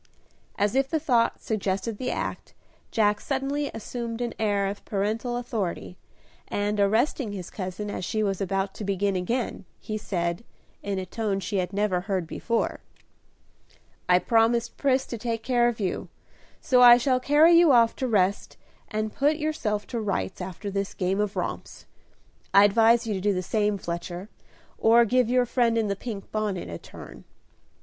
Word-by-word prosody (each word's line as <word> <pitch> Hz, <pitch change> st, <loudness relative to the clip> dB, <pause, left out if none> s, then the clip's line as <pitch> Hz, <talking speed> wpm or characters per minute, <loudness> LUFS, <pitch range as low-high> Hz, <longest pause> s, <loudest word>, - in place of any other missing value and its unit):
As 205 Hz, +1 st, +1 dB
if 270 Hz, +1 st, +1 dB
the 320 Hz, -, 0 dB
thought 245 Hz, -6 st, +1 dB
suggested 205 Hz, 0 st, -2 dB
the 255 Hz, -, -2 dB
act, -, -, -4 dB, 0.3 s
Jack 210 Hz, -2 st, +2 dB
suddenly 280 Hz, +1 st, -2 dB
assumed 230 Hz, +1 st, -5 dB
an 240 Hz, -1 st, -2 dB
air 205 Hz, -2 st, +1 dB
of 200 Hz, +1 st, -4 dB
paternal 220 Hz, +4 st, -2 dB
authority, 220 Hz, -8 st, -4 dB, 0.5 s
and, 205 Hz, +1 st, -1 dB
arresting 220 Hz, +3 st, +1 dB
his 185 Hz, -4 st, -7 dB
cousin 195 Hz, +2 st, -5 dB
as -, -, -5 dB
she 215 Hz, +4 st, -1 dB
was 195 Hz, -1 st, -1 dB
about 195 Hz, 0 st, -1 dB
to -, -, -7 dB
begin 200 Hz, 0 st, 0 dB
again, 230 Hz, +6 st, -2 dB, 0.2 s
he 215 Hz, 0 st, -5 dB
said, 170 Hz, -1 st, -2 dB, 0.4 s
in 200 Hz, -1 st, -3 dB
a 190 Hz, -, -3 dB
tone 200 Hz, 0 st, -2 dB
she 200 Hz, +1 st, -3 dB
had 180 Hz, -1 st, -1 dB
never 200 Hz, -3 st, 0 dB
heard 190 Hz, -2 st, -2 dB
before, 230 Hz, +7 st, -2 dB, 1.3 s
"I 180 Hz, -, +7 dB
promised 230 Hz, +3 st, +2 dB
Pris 265 Hz, -1 st, +1 dB
to 235 Hz, -, -6 dB
take 230 Hz, -1 st, -3 dB
care 240 Hz, -1 st, +3 dB
of 240 Hz, -2 st, -2 dB
you, 190 Hz, -3 st, -3 dB, 0.5 s
so 250 Hz, -2 st, +3 dB
I 240 Hz, -1 st, +10 dB
shall 255 Hz, +1 st, +1 dB
carry 295 Hz, +6 st, +5 dB
you 335 Hz, -2 st, +7 dB
off 230 Hz, -3 st, +5 dB
to 260 Hz, -, -1 dB
rest, 200 Hz, -3 st, 0 dB, 0.3 s
and 215 Hz, 0 st, -3 dB
put 290 Hz, +3 st, +2 dB
yourself 275 Hz, -10 st, -2 dB
to 235 Hz, -2 st, -4 dB
rights 185 Hz, -, -2 dB
after 190 Hz, +3 st, -6 dB
this 195 Hz, 0 st, -3 dB
game 190 Hz, +1 st, -1 dB
of 210 Hz, 0 st, -1 dB
romps. -, -, -5 dB, 0.7 s
I 200 Hz, -, +9 dB
advise 225 Hz, +3 st, +4 dB
you 220 Hz, -, -2 dB
to 190 Hz, -, -3 dB
do 205 Hz, 0 st, +1 dB
the 185 Hz, -, -2 dB
same, 210 Hz, +1 st, 0 dB
Fletcher, 175 Hz, +2 st, -6 dB, 0.5 s
or 235 Hz, +1 st, +5 dB
give 245 Hz, +1 st, +2 dB
your 250 Hz, 0 st, +3 dB
friend 235 Hz, -1 st, +1 dB
in 220 Hz, -2 st, +1 dB
the 200 Hz, -, 0 dB
pink 200 Hz, -1 st, -7 dB
bonnet 210 Hz, -, -2 dB
a 85 Hz, -, -6 dB
turn." -, -, -12 dB
215 Hz, 175 wpm, -26 LUFS, 195-240 Hz, 1.3 s, I